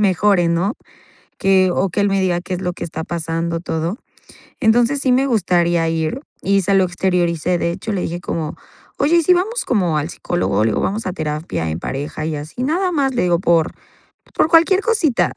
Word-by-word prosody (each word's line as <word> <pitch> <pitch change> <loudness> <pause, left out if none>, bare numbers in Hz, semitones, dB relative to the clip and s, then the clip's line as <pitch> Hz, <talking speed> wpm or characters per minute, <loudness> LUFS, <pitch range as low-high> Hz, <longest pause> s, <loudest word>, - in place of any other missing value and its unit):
mejore, 195 -2 +3
¿no?, 175 +7 0 0.6
que 190 -1 +3
o 195 - +1
que 185 - -2
él 200 - +3
me 195 0 +1
diga 180 -2 +1
qué 180 +1 -5
es 180 - -4
lo 180 -1 -2
que - - -7
está 160 -1 -5
pasando, 165 0 -3
todo. 170 +4 -3 0.6
Entonces, 240 +3 +3
sí 260 -2 +2
me 265 +2 +3
gustaría 175 -7 +2
ir 165 +9 -2 0.2
y 195 0 +2
se 195 +2 +1
lo 195 - +5
exterioricé, 175 -1 0
de 170 - 0
hecho, 215 +5 -4
le 195 - -1
dije 170 +1 -4
como: 160 -3 -4 0.4
"Oye, 300 +5 +3
¿y - - +3
si 360 - +4
vamos 400 +7 0
como 180 -9 +1
al 150 +2 -2
psicólogo?", 100 - -1
le 110 - +2
digo: - - -1
"Vamos 215 +3 -2
a 185 - -1
terapia 150 - -3
en 80 - -3
pareja 145 - -4
y 160 - -2
así, 150 +12 -5
nada 360 +7 +1
más, 275 -6 0
le 245 - +1
digo, 175 -1 +2
por 170 -2 +2 0.6
por 310 - +2
cualquier 335 +4 +5
cosita", 410 - +1
180 Hz, 205 wpm, -19 LUFS, 165-235 Hz, 0.6 s, lo